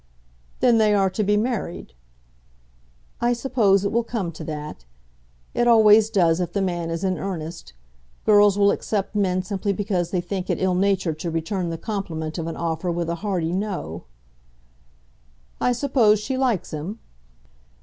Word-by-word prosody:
"Then 240 -3 +5
they 210 -1 +4
are 195 -2 +2
to 210 +3 -1
be 210 +1 +2
married?" 215 - -3 1.3
"I 240 0 +3
suppose 220 -6 +2
it 200 - 0
will 235 +1 +1
come 220 -7 -3
to 160 0 -9
that. 150 - -6 0.7
It 240 - +1
always 220 -2 +6
does 170 -5 +2
if 175 -1 -3
the 200 - 0
man 175 -3 -2
is 165 +1 -3
in 185 -1 0
earnest. 170 - -6 0.5
Girls 205 -1 +5
will 200 0 +5
accept 205 -1 -2
men 185 -3 +1
simply 200 +1 -2
because 190 -4 -1
they 180 - -1
think 180 +1 -4
it - - 0
ill 190 -1 +1
natured 185 -4 0
to 170 - -3
return 165 +3 -2
the 165 - -4
compliment 165 -6 -4
of 165 - -3
an 165 - -5
offer 165 +1 -2
with 170 0 -2
a - - -1
hearty 180 -6 -1
'No.'" 180 - -4 1.6
"I - - +3
suppose 240 -4 +3
she 260 +5 -3
likes 255 -7 0
him?" 155 +8 -5
195 Hz, 165 wpm, -23 LUFS, 170-210 Hz, 1.6 s, always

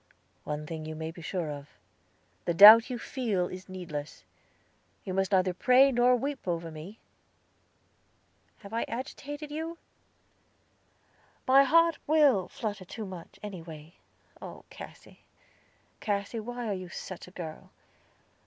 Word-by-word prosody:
One 150 0 -4
thing 160 0 -6
you 155 - -5
may 160 +1 -5
be 170 - -12
sure 165 -2 -3
of. 145 0 -8 0.8
The 170 - 0
doubt 220 +6 +10
you 250 - -3
feel 220 -7 -1
is 185 +1 -9
needless. 160 -6 -7 0.8
You 185 - -4
must 190 +1 0
neither 185 -1 +3
pray 255 +7 +5
nor 245 0 +4
weep 275 -1 -4
over 170 -1 -2
me. 160 +8 -9 1.6
Have 200 +2 -11
I 230 - 0
agitated 290 +4 -6
you?" 325 +2 -4 1.7
"My 270 +2 +7
heart 335 +3 +4
will 285 - +4
flutter 205 -3 -5
too 215 +4 -7
much, 185 -3 -10
anyway. 165 -5 -9 0.5
Oh, - - -9
Cassy, - - -12 0.8
Cassy, 205 +2 -2
why 240 +2 -5
are 210 - -1
you 185 -2 -6
such 180 +1 -8
a - - -13
girl? 160 -3 -7
195 Hz, 135 wpm, -29 LUFS, 170-250 Hz, 1.7 s, doubt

